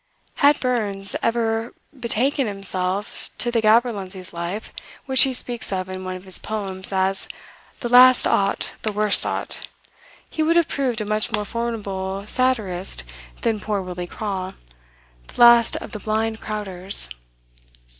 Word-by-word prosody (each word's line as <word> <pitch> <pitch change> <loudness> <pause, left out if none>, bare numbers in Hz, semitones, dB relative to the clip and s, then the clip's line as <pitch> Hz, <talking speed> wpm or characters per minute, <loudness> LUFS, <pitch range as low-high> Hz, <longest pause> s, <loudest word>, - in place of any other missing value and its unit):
Had 285 +1 +5
Burns 205 -6 -1
ever 230 0 0 0.2
betaken 260 +2 0
himself 195 0 -2
to 240 - 0
the 230 -1 +1
gaberlunzie's 210 -5 +1
life, 175 +5 -5 0.3
which 265 -2 +3
he 270 - +5
speaks 240 -3 +2
of 185 -1 -2
in 185 0 -6
one 185 0 -4
of 185 - -9
his 190 - -5
poems 195 -3 -4
as 190 0 0 0.5
"the 240 - -2
last 250 +1 +7
o't, 195 0 +1
the 215 - -1
worst 210 0 +4
o't," - - -3 0.6
he 315 - -4
would 320 +2 +3
have 340 -3 +4
proved 250 -5 -1
a - - -3
much 215 +1 -1
more 210 -2 0
formidable 200 -4 -4
satirist 210 - -1 0.4
than 225 -2 0
poor 210 -1 -2
Willie 180 -1 -5
Craw, 190 -2 -4 0.7
the - - -12
last 235 -1 +7
of - - -6
the 210 - -6
"blind 220 +1 -1
crowders." 195 - -2
215 Hz, 145 wpm, -22 LUFS, 190-235 Hz, 0.7 s, last